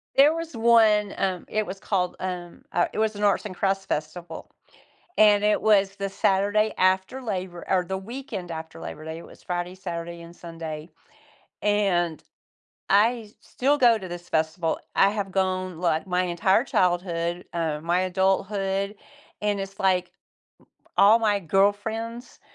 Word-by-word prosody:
There 285 +3 +6
was 330 -4 -5
one, 220 -3 +4
um, 185 -2 -1
it 215 0 0
was 195 +1 -7
called, 180 -3 -1
um 180 -2 -6
uh, 175 - +2
it - - -3
was 220 -1 +1
an 205 - -4
Arts 205 0 +2
and 185 -3 -6
Crafts 195 0 0
festival, 160 +2 -5 0.7
and 210 -1 +6
it 210 0 +3
was 200 -2 +3
the 195 0 -3
Saturday 205 +3 +2
after 190 +7 +1
Labor 185 -6 -4
or 185 -1 +2
the 190 +2 -3
weekend 205 -3 -7
after 160 0 -7
Labor 155 - -7
day, 160 0 -6
it 170 - -11
was - - -16
Friday, 180 0 -3
Saturday, 170 -2 -6
and 170 +1 -13
Sunday, 165 -1 -7 0.7
and 185 -6 +1 0.7
I 220 +2 +3
still 285 +3 0
go 235 -4 +5
to 185 - -7
this 175 0 -8
festival. 160 +1 0 0.2
I 195 - +5
have 200 -2 -3
gone, 185 -2 -1
like, 170 0 0
my 180 0 +1
entire 185 +5 +2
childhood, 175 -4 0
um, 160 -3 -2
my 175 +2 +2
adulthood, 195 +2 0 0.5
and 205 -1 0
it's, 195 0 -7
like, 185 -2 +1 0.9
all 210 +3 +7
my 210 -2 +2
girlfriends, 205 +6 -1
190 Hz, 155 wpm, -25 LUFS, 175-210 Hz, 0.9 s, all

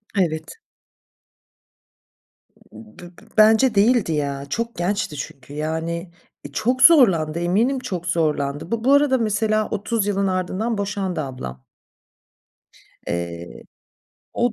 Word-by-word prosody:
Evet. 160 -4 -1 2.2
B 110 0 -14
b 175 - -12 0.3
bence 220 +3 +5
değildi 210 -3 +3
ya, 140 -2 -2
çok 230 +7 -3
gençti 175 -2 -2
çünkü, 135 0 -8
yani, 160 +3 -3 0.3
e, - - -9
çok 250 +4 0
zorlandı, 185 - +5
eminim 215 +10 +1
çok 180 -8 -5
zorlandı. 150 -4 -1 0.2
Bu 270 - +4
arada 285 -2 +4
mesela 215 -1 0
30 205 +1 -1
yılın 200 -1 0
ardından 190 +5 -2
boşandı 195 -4 -2
ablam. 65 - -7 1.4
Eee, 85 -5 -5 0.7
o 240 -1 +1
185 Hz, 105 wpm, -22 LUFS, 155-220 Hz, 2.2 s, bence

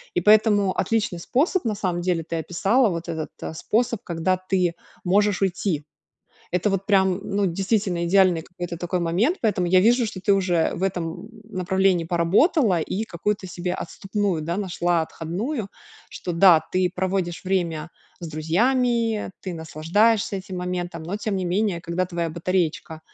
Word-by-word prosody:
И - - +3
поэтому 210 -1 +4
отличный 215 -2 0
способ 300 - +1
на 220 - +1
самом 180 -4 -2
деле 175 -2 0
ты 165 - -4
описала, 200 +9 +2
вот 170 -1 -4
этот, 160 -2 -4
э, - - -5
способ, 230 +5 0
когда 170 +2 0
ты 185 -2 0 0.3
можешь 200 +2 +2
уйти. 175 -5 -1 0.7
Это 180 +3 +1
вот 195 0 -2
прям, 190 -2 +3
ну, 205 -1 0
действительно 190 -1 0
идеальный 185 -3 +4
какой-то 175 0 -7
такой 175 +1 -2
момент, 190 - +1
поэтому 205 -5 +1
я 185 +1 +5
вижу, 235 +3 +4
что 185 -3 -6
ты 200 - +2
уже 180 -4 +1
в 175 - -6
этом, 180 -3 -1 0.2
м, - - -17 0.2
направлении 185 -2 +1
поработала 180 - +3
и 195 +7 -2
какую-то 200 +1 -3
себе 180 +1 -3
отступную, 195 -6 -2
да, 170 +3 -2
нашла, 175 -3 0
отходную, 195 - -4 0.4
что 175 - -5
да, 170 -1 +6
ты 185 -1 +2
проводишь 185 -2 -2
время 170 -4 -1 0.3
с 170 - -6
друзьями, 225 - +1
ты 185 -3 -5
наслаждаешься 195 +7 +1
этим 190 -1 -6
моментом, 180 -2 -4
но 185 +5 -3
тем 210 -1 -3
не 185 - -2
менее, 185 0 0
когда 170 +2 -1
твоя 170 -2 -2
батареечка 165 -2 -2
185 Hz, 160 wpm, -23 LUFS, 170-205 Hz, 0.7 s, да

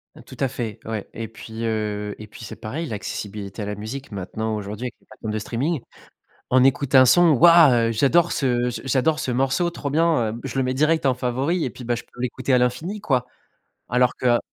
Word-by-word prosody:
Heu, - - -13
tout - - -13
à 135 - +2
fait, 115 -3 -5
ouais 110 -2 -4
et 115 0 -5
puis, 110 +1 -8
heu 105 -2 -2
et 105 - -9
puis, 110 - -12
c'est - - -8
pareil, 150 +10 -5
l'accessibilité 105 -3 -6
à - - -3
la 105 0 -4
musique 115 +7 -7
maintenant, 110 +3 -3
aujourd'hui, 105 +3 -5
avec 125 - -5
les - - -30
plateformes 110 - -7
de 110 - -1
streaming, 130 +8 -2 0.7
on 130 0 +5
écoute 135 +1 +2
un 130 0 +9
son: 170 +6 +6
«Waouh, 165 +1 +7 0.2
heu, - - 0
j'adore 150 +9 +3
ce 125 -2 +1
j 120 - -5
j'adore 135 +4 +1
ce 125 - -2
morceau. 135 +7 +1
Trop 155 -4 -5
bien, 155 -8 +2
heu, 115 - -8
je 135 -1 -5
le 135 - +2
mets 130 0 -1
direct 155 +3 +2
en 135 - +4
favori 130 +7 -1
et - - -2
puis, 125 +3 -11
bah, 120 0 0
je 120 - -7
peux - - -19
l'écouter 125 +1 -1
à - - +6
l'infini, 125 +12 -1
quoi». 130 -10 +1 0.6
Alors 125 +1 +2
que - - -3
heu 120 -1 +5
125 Hz, 230 wpm, -23 LUFS, 110-140 Hz, 0.7 s, un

